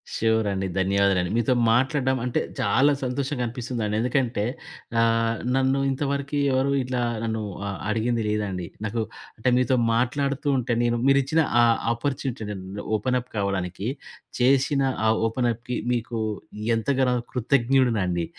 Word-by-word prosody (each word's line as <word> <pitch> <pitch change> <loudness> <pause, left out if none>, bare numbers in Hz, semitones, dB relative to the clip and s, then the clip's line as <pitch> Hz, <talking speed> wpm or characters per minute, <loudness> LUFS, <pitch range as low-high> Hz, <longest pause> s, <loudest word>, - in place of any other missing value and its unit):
షురండి. 105 -4 +1
ధన్యవాదాలండి. 95 -1 +2
మీతో 120 +2 +2 0.2
మాట్లాడడం 130 +2 +2
అంటే 125 - 0 0.2
చాలా 135 +8 +3
సంతోషంగా 130 0 -2
అనిపిస్తుందండి. 115 -3 -3
ఎందుకంటే 125 -4 0 0.6
ఆహ్, 115 0 +2 0.2
నన్ను 135 +1 +2
ఇంతవరకి 140 +1 -2
ఎవరు 135 +1 +2
ఇట్లా 125 -1 -2 0.2
నన్ను 110 -1 -2 0.3
ఆహ్, 100 - -4
అడిగింది 115 +1 0
లేదండి. 100 -5 -2 0.2
నాకు 115 +2 -1 0.4
అంటే 125 +3 +1
మీతో 125 0 +2 0.2
మాట్లాడుతూ 140 +4 0
ఉంటే, 125 -1 -2
నేను 120 0 +1
మీరిచ్చిన 140 +4 +3 0.2
ఆ - - +6 0.3
అపార్చునిటీ 130 -1 -3 0.2
న్ 95 +2 -7 0.2
ఓపెన్ 125 +4 0
అప్ 125 - -19
కావడానికి 100 0 -2 0.5
చేషిన 135 +2 +3 0.2
ఆ - - +5 0.2
ఓపెన్ 120 +1 0
అప్‌కి 120 +2 -5 0.2
మీకు 120 0 -3 0.6
ఎంతగానో 130 +1 +1 0.2
కృతజ్ఞుడునండి. 120 -8 +2
120 Hz, 125 wpm, -25 LUFS, 110-130 Hz, 0.6 s, ఆ